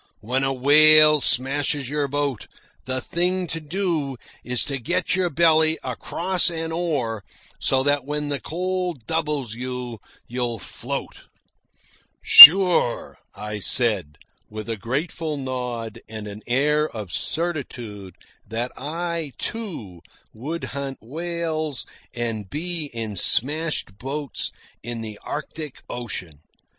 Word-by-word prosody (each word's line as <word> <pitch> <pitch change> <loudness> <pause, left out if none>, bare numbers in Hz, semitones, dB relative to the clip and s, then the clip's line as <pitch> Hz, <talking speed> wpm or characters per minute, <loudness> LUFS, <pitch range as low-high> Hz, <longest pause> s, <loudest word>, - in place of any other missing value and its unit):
When 130 +5 -1
a 135 - +1
whale 150 +3 +6
smashes 140 +2 +1
your 145 +1 -1
boat, 140 -3 -2 0.4
the 130 +1 -2
thing 180 +2 -1
to 165 -1 -4
do 155 -4 -2 0.3
is 125 0 0
to 140 -1 -3
get 175 +8 -1
your 185 -2 +1
belly 160 0 +3
across 180 +1 0
an 165 -1 -4
oar, 140 - -2 0.4
so 130 0 +1
that 145 -1 +1
when 150 +1 -4
the 140 -1 -2
cold 180 -3 -3
doubles 150 -6 -2
you 125 -1 -6 0.3
you'll 120 -1 -3
float." - - -7 0.9
"Sure," 180 -6 +9 0.2
I 105 0 -6
said, 100 - +1 0.3
with 110 0 -8
a 115 - -1
grateful 145 - -3
nod 125 -4 -5
and 110 -1 -7
an 105 +1 -9
air 150 +5 +1
of 105 -6 -8
certitude 120 - -4 0.3
that 120 +3 -3
I, 165 0 -4
too, 155 - -5 0.3
would 150 +10 -6
hunt 140 -1 -5
whales 160 0 -4 0.3
and 115 -4 -4
be 165 0 -4
in 115 -5 -6
smashed 145 - 0
boats 140 +2 -4 0.3
in 120 0 -6
the 110 -2 -7
Arctic 150 -1 -7
Ocean. 95 -11 -6
140 Hz, 120 wpm, -23 LUFS, 115-160 Hz, 0.9 s, Sure